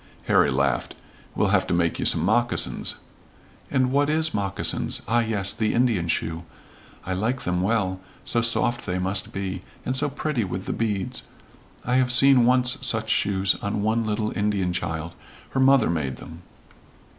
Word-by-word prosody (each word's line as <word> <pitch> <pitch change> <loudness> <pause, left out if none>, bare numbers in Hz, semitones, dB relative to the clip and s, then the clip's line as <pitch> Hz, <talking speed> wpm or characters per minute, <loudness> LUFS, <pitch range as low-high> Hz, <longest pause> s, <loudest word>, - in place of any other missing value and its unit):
Harry - - +3
laughed. 70 -2 -1 0.4
"We'll - - +1
have - - +2
to - - 0
make 85 -1 0
you - - +2
some 80 - +1
moccasins." 120 +4 +1 0.7
"And 130 -2 +1
what 145 +1 +2
is 155 +1 +1
moccasins? 100 -2 -1
Ah, 120 +1 +2
yes, 105 -4 0
the 110 -1 -1
Indian 115 -8 +1
shoe. 80 0 -2 0.6
I 95 - -2
like 115 +7 -1
them 90 0 -1
well, 95 -2 0 0.3
so 115 - +1
soft 120 +1 0
they 90 -1 -1
must 95 +1 -1
be, 95 -1 -4 0.2
and 130 - -1
so 145 +2 +1
pretty 140 -3 -2
with 95 0 -5
the - - -2
beads. 105 -4 -2 0.6
I 125 +1 +2
have 125 -1 +2
seen 125 -1 +6
once 125 0 +3
such 110 -4 0
shoes 95 -1 +2
on 100 0 -2
one 110 +2 +1
little 110 0 -2
Indian 100 -4 0
child. 80 -1 -3 0.4
Her 135 - -1
mother 135 -7 +4
made 70 -6 -2
them." 80 +1 -12
105 Hz, 170 wpm, -24 LUFS, 95-125 Hz, 0.7 s, seen